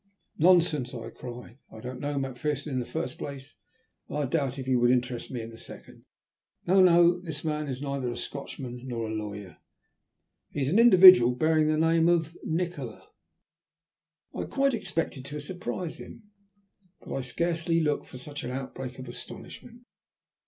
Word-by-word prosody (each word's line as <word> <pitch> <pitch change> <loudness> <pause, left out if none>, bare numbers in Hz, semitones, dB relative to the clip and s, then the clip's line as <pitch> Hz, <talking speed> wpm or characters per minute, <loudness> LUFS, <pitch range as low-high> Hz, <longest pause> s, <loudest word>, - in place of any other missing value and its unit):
"Nonsense," 160 -7 +4
I 115 -1 -7
cried. 125 0 -10
"I 110 - -11
don't 125 +3 -7
know 145 0 -3
Macpherson 140 +2 -3
in 130 - 0
the 120 - -4
first 125 - -4
place, 140 0 -7 0.5
and - - -4
I 145 - 0
doubt 135 -1 -1
if 130 - -5
he 130 -1 +2
would 120 0 +4
interest 125 -1 0
me 125 -3 -4
in 115 - -8
the 115 - -12
second. - - -10 0.6
No! 190 +2 +5
no! 175 -1 +6
this 160 -4 -5
man 150 -1 -2
is 130 0 -4
neither 140 -3 -2
a 120 - -5
Scotchman 130 -3 -6
nor 115 -3 -3
a - - -5
lawyer. 105 -4 -6 0.9
He 145 - -4
is 135 - +1
an 195 +8 +3
individual 185 - +9
bearing 155 +2 +3
the 155 0 +2
name 165 +1 +3
of 165 -1 +1
Nikola." 175 +2 -4 1.2
I - - -6
had - - -4
quite 275 0 +2
expected 165 - -3
to 145 +1 -6
surprise 175 +2 -5
him, 235 - -11 0.8
but - - -8
I 135 - -2
scarcely 165 +6 0
looked 150 -3 0
for 130 - -10
such 145 +3 -7
an - - -4
outbreak 130 0 -6
of 130 -1 -8
astonishment. 235 - -8
145 Hz, 175 wpm, -28 LUFS, 125-165 Hz, 1.2 s, individual